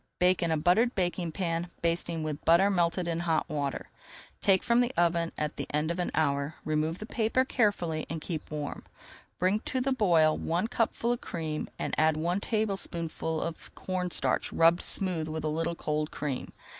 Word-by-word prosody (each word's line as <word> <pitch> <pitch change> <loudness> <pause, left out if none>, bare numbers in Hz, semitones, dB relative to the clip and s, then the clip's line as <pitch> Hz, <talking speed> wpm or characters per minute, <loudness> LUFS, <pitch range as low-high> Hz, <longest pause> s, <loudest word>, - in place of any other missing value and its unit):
Bake 180 0 +3
in 170 - +1
a 160 - +2
buttered 200 +10 +3
baking 175 -2 -1
pan, 170 0 -2
basting 170 -1 0
with 150 -1 -4
butter 180 +5 +5
melted 175 -1 +1
in 165 -1 -1
hot 165 -2 0
water. 145 -2 -3 0.5
Take 195 -2 +4
from 235 0 +4
the 245 0 +1
oven 170 -1 +2
at 150 0 -2
the - - -4
end 150 +2 0
of 170 - -4
an 180 - 0
hour, 140 -1 0
remove 155 +2 0
the 215 - -7
paper 230 +3 +1
carefully, 190 -11 0
and 165 - -3
keep 160 -1 -5
warm. 150 -1 -5 0.5
Bring 190 +4 +2
to 260 - -2
the 265 +2 0
boil 170 -11 +4
one 175 +6 -1
cupful 235 0 0
of 240 - -2
cream 155 -2 -4
and - - -3
add 155 0 +3
one 175 +4 0
tablespoonful 190 -7 -1
of 165 -1 -6
corn 185 -1 -2
starch - - +1
rubbed 165 +1 +4
smooth 180 -5 0
with 155 0 -4
a 155 - 0
little 165 +2 -1
cold 150 -1 -2
cream. 140 -4 -4
170 Hz, 185 wpm, -29 LUFS, 155-190 Hz, 0.5 s, butter